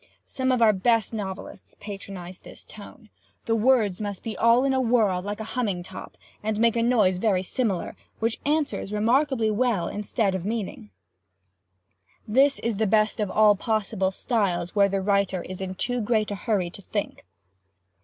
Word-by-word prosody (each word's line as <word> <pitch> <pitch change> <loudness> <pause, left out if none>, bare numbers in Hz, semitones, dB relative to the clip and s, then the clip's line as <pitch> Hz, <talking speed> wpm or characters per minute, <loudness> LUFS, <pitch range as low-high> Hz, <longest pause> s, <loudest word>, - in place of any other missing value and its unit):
Some 260 0 -1
of 250 -2 +3
our 215 -1 +6
best 225 +3 +1
novelists 195 -3 -7
patronize 195 -3 -8
this - - -12
tone. 215 +2 -13 0.3
The 225 - +1
words 220 -4 +2
must 205 -2 -5
be 225 - -4
all 230 +2 +4
in 275 -1 +2
a 260 - +2
whirl, 220 -7 +2
like 205 +3 -5
a - - -4
humming 205 -8 -1
top, - - -10 0.2
and 215 0 -2
make 230 0 +3
a 230 - +1
noise 215 -7 +3
very 190 -3 +1
similar, 200 -3 -2 0.2
which 225 +1 -1
answers 295 -8 -1
remarkably 230 +2 +2
well 220 -4 +1
instead 210 -1 -1
of 190 -2 -3
meaning. 205 - -4 1.4
This 270 +6 +4
is 230 -3 -1
the 220 0 +1
best 215 +2 +2
of 210 -2 0
all 210 0 +5
possible 210 -2 -1
styles 190 -5 -1
where 200 -1 +4
the 195 0 -1
writer 200 -2 +1
is 185 0 -8
in 190 0 -4
too 245 +5 -2
great 215 -1 0
a - - -2
hurry 195 -5 -1
to 200 - -10
think. 205 +1 -4
215 Hz, 175 wpm, -25 LUFS, 195-230 Hz, 1.4 s, our